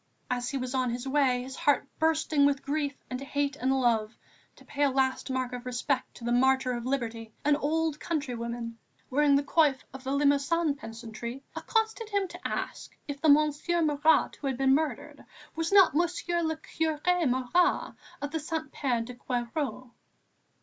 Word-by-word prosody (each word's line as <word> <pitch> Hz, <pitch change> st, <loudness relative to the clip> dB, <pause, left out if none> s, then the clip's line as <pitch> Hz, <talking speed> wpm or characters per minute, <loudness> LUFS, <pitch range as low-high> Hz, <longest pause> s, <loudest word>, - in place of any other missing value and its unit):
As 245 Hz, 0 st, -1 dB
he 275 Hz, -, -2 dB
was 255 Hz, 0 st, -4 dB
on 255 Hz, -2 st, +1 dB
his 240 Hz, +2 st, -4 dB
way, 265 Hz, -3 st, +2 dB
his 260 Hz, +1 st, -8 dB
heart 285 Hz, -1 st, +2 dB
bursting 315 Hz, -2 st, +2 dB
with 280 Hz, -1 st, +2 dB
grief 285 Hz, 0 st, -1 dB, 0.2 s
and 255 Hz, +1 st, -3 dB
hate 285 Hz, 0 st, -1 dB
and 265 Hz, -2 st, 0 dB
love, 235 Hz, -4 st, +1 dB, 0.4 s
to -, -, -18 dB
pay 290 Hz, -, -5 dB
a 285 Hz, -, +5 dB
last 265 Hz, 0 st, 0 dB
mark 255 Hz, -1 st, -2 dB
of 245 Hz, -1 st, -5 dB
respect 250 Hz, +2 st, -2 dB
to -, -, -12 dB
the 240 Hz, -, -1 dB
martyr 265 Hz, +1 st, +3 dB
of 240 Hz, 0 st, -3 dB
liberty, 230 Hz, -4 st, -3 dB
an 295 Hz, 0 st, +5 dB
old 310 Hz, +1 st, 0 dB
countrywoman, 235 Hz, -6 st, -4 dB, 0.3 s
wearing 285 Hz, +1 st, +4 dB
the 280 Hz, -, +3 dB
coif 295 Hz, -2 st, +3 dB, 0.2 s
of 265 Hz, -1 st, -9 dB
the 265 Hz, -, -3 dB
Limousin 285 Hz, +3 st, +2 dB
peasantry, 235 Hz, 0 st, -8 dB
accosted 445 Hz, 0 st, -1 dB
him 400 Hz, -2 st, 0 dB
to -, -, -6 dB
ask -, -, -5 dB
if 285 Hz, -1 st, -5 dB
the 315 Hz, -, +4 dB
Monsieur 305 Hz, +3 st, +3 dB
Marat 305 Hz, +1 st, +3 dB
who 285 Hz, -, -4 dB
had 265 Hz, -2 st, -1 dB
been 265 Hz, 0 st, +4 dB
murdered 290 Hz, 0 st, -2 dB, 0.3 s
was 325 Hz, +2 st, -1 dB
not 390 Hz, -7 st, +7 dB
Monsieur 345 Hz, +1 st, 0 dB
le 320 Hz, -1 st, -1 dB
Curé 320 Hz, +1 st, 0 dB
Mara, 260 Hz, +8 st, +1 dB, 0.3 s
of 300 Hz, +2 st, -2 dB
Saint 315 Hz, -1 st, -4 dB
Pierre 250 Hz, -5 st, 0 dB
de 250 Hz, +2 st, -8 dB
Queyroix. 250 Hz, +1 st, -3 dB
280 Hz, 175 wpm, -29 LUFS, 250-310 Hz, 0.4 s, not